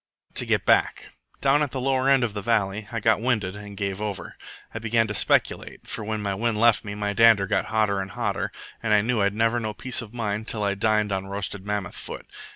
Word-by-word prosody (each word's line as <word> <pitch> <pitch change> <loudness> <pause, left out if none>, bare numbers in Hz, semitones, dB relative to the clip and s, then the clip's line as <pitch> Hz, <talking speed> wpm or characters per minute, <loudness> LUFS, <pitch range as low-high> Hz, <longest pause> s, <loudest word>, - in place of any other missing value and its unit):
"But - - -36
to - - +2
get - - +1
back. - - +2 0.3
Down 140 +2 +4
at 150 - +1
the 130 - -4
lower 130 0 +1
end 135 -2 +5
of 115 -4 -1
the 105 - -4
valley 105 -1 0
I 115 - -2
got 110 0 +2
winded 110 -6 0
and 105 -1 -9
gave 100 0 -3
over. 105 -2 -5 0.4
I 115 - -4
began 115 0 +2
to 105 - -4
speculate, - - 0
for - - -5
when 110 0 -3
my 100 -1 -1
wind 110 +2 -1
left 115 -1 +4
me 100 -1 -6
my 105 0 -2
dander 115 -3 +5
got 100 - 0
hotter 110 -4 +1
and 95 - -6
hotter, - - -2 0.3
and 110 -2 +2
I 105 - +5
knew 115 0 0
I'd 100 +1 +1
never 115 +2 +2
know 110 -2 -4
peace 130 +2 +1
of 110 -3 -10
mind 110 -2 -3
till 105 -2 0
I 100 -1 +1
dined 105 +1 +1
on 95 0 -2
roasted 100 0 -4
mammoth 105 -1 -2
foot. - - -8
105 Hz, 240 wpm, -25 LUFS, 100-115 Hz, 0.4 s, end